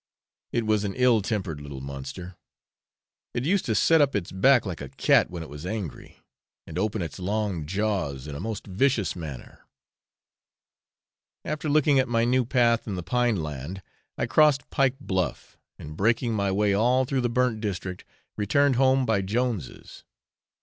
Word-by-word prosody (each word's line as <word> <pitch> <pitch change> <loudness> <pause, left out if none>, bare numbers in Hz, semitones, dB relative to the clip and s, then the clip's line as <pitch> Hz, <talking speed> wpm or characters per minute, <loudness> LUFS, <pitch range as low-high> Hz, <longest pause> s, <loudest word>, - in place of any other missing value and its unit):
It 115 -1 0
was 105 -1 +2
an 100 -1 -3
ill 125 -4 +4
tempered 95 -8 -3
little 70 -2 -8
monster; 70 +7 -7 1.0
it 120 - -1
used 190 +4 +1
to 110 - 0
set 160 +9 +4
up 140 -1 +2
its 100 -4 -2
back 125 +6 +4
like 90 -6 -5
a 70 - -6
cat - - +3
when 85 -2 -6
it - - -9
was 75 +1 -9
angry, 95 -4 -6 0.5
and 80 +2 -5
open 105 -1 -1
its 85 - -7
long 95 -4 -2
jaws 95 -9 -2
in 75 - -6
a 70 - -6
most 110 +3 -5
vicious 110 +2 +1
manner. 75 -7 -8 1.9
After 155 0 -3
looking 145 -2 +4
at 130 - +2
my 115 -1 +1
new 125 +1 +2
path 120 -2 +2
in 100 - -3
the 90 - -4
pine 120 -5 +1
land, 75 +6 -6 0.3
I - - 0
crossed 150 -4 +3
Pike 135 -1 +2
Bluff, 95 -9 -3 0.2
and 75 +1 -9
breaking 115 +5 +1
my 100 -2 0
way 100 +1 +2
all 125 +6 +3
through 130 0 -1
the 120 - 0
burnt 120 -2 0
district, 90 -3 -4 0.3
returned 130 +6 +2
home 130 0 +3
by 110 -4 +1
Jones's. 110 - -3
105 Hz, 170 wpm, -26 LUFS, 90-125 Hz, 1.9 s, ill